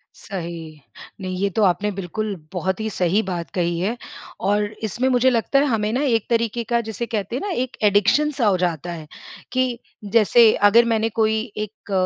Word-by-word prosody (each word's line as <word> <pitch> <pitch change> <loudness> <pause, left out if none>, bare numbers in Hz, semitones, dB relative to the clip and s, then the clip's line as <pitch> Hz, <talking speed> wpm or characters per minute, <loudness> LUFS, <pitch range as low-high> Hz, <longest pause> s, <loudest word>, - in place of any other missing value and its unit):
सही। 165 -5 -7 0.4
नहीं, 185 -1 -4
ये 200 - +2
तो 210 +3 0
आपने 195 +2 +2
बिल्कुल 200 +2 -4 0.2
बहुत 190 +1 -2
ही 220 0 -2
सही 185 +1 +1
बात 170 -4 -4
कही 170 -1 -1
है 210 +7 -1 0.5
और 205 +1 +2 0.2
इसमें 235 +5 -1
मुझे 255 0 +4
लगता 250 +3 +2
है, 285 - +3
हमें 220 -5 0
ना 255 - 0
एक 230 -6 +1
तरीके 230 0 0
का, 235 +1 0
जिसे 220 +1 -4
कहते 215 -1 -3
हैं 260 - -2
ना 410 - -3
एक 255 -1 -5
एडिक्शन 210 +9 +3
सा 265 -5 -1
हो 195 -2 +3
जाता 175 -1 -2
है 160 -2 -9 0.5
कि 255 -2 0 0.3
जैसे 230 0 +6 0.2
अगर 235 +3 +6
मैंने 225 -1 +1
कोई 220 0 +1 0.2
एक 210 0 -7
215 Hz, 190 wpm, -22 LUFS, 185-235 Hz, 0.5 s, जैसे